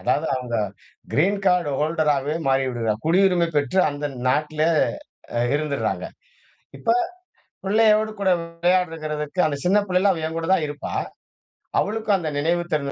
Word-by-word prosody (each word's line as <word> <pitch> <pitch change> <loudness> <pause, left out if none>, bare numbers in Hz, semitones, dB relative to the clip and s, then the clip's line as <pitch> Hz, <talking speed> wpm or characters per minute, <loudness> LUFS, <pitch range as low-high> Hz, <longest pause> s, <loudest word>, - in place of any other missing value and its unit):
அதாவது 160 - 0
அவுங்க 125 -2 -3 0.6
green 195 +7 +2
card 180 -5 +2
holder 155 0 +1
ஆகவே 140 +3 -2
மாறிவிடுகிறார்கள் 130 -5 +1
குடியுரிமை 180 0 +3
பெற்று 145 +6 +1
அந்த 145 +1 -4 0.2
நாட்ல 150 +3 0 0.8
அ - - +2 0.2
இருந்துறாங்க. 145 -2 -2 0.7
இப்ப - - -1 0.8
பிள்ளையோடு 215 +1 +3
கூட 195 -1 +1
விளையாடுகிறதுக்கு, 165 -2 -1
அந்த 145 -2 -2
சின்ன 195 +3 +4
பிள்ளையில 185 +2 +3
அவ 165 -3 -3
என் 165 +1 -5
கூட 165 - -3
தான் 165 - +2
இருப்பா. 145 0 -6 0.9
அவளுக்கும் 215 0 0
அந்த 160 -4 -3
நினைவு 170 +4 +1
தெரிந்த 140 -2 0
160 Hz, 135 wpm, -23 LUFS, 145-185 Hz, 0.9 s, சின்ன